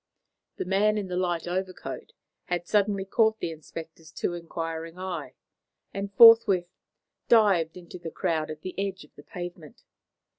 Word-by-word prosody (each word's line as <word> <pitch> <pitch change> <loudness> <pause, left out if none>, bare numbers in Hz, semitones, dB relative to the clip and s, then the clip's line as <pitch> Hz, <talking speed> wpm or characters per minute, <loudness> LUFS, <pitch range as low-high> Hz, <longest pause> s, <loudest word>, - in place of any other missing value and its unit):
The - - -4
man 205 +3 +2
in 200 -3 -3
the 180 - -3
light 175 -2 -1
overcoat 185 +1 -5 0.3
had 175 -1 -2
suddenly 200 0 +1
caught 220 +2 +2
the 165 - -3
inspector's 160 +1 -10
too - - -2
inquiring 165 0 -5
eye, 170 -8 -5 0.6
and 200 0 -4
forthwith 225 -6 +8 0.6
dived 190 -8 +4
into 180 0 -10
the 170 -1 -6
crowd 160 -1 -1
at 155 0 -7
the 185 - -6
edge 195 -1 -3
of 150 - -21
the - - -14
pavement. 175 -1 -9
180 Hz, 150 wpm, -27 LUFS, 165-195 Hz, 0.6 s, forthwith